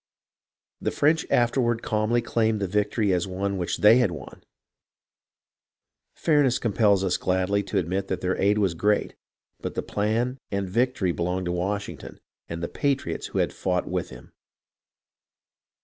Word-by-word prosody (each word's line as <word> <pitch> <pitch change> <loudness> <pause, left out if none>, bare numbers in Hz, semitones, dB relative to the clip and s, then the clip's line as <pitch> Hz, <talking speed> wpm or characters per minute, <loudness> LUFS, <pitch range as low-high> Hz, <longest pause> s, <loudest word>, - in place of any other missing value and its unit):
The - - 0
French 155 +3 +2
afterward 120 -1 +2
calmly 110 +2 +1
claimed 110 -2 +1
the 100 - -1
victory 105 +1 +1
as 90 +1 0
one 95 +1 -2
which 90 - -2
they 105 +3 +7
had 125 -5 +3
won. 75 -7 -9 1.7
Fairness 145 -6 +3
compels 105 -3 +2
us 90 -2 +1
gladly 95 +2 +1
to 100 - -3
admit 95 +3 -1
that - - -2
their 95 0 -1
aid 100 +2 +2
was 100 -5 +2
great, 105 +5 +1 0.5
but - - -5
the - - -2
plan 115 +5 -1
and 100 -1 -2
victory 115 -2 +1
belonged 90 +2 -2
to 90 - -1
Washington 100 +3 -4 0.3
and 85 0 -5
the - - 0
patriots 135 -12 -2
who - - -5
had - - +1
fought 90 -1 -1
with - - -2
him. - - -13
100 Hz, 150 wpm, -25 LUFS, 90-115 Hz, 1.7 s, they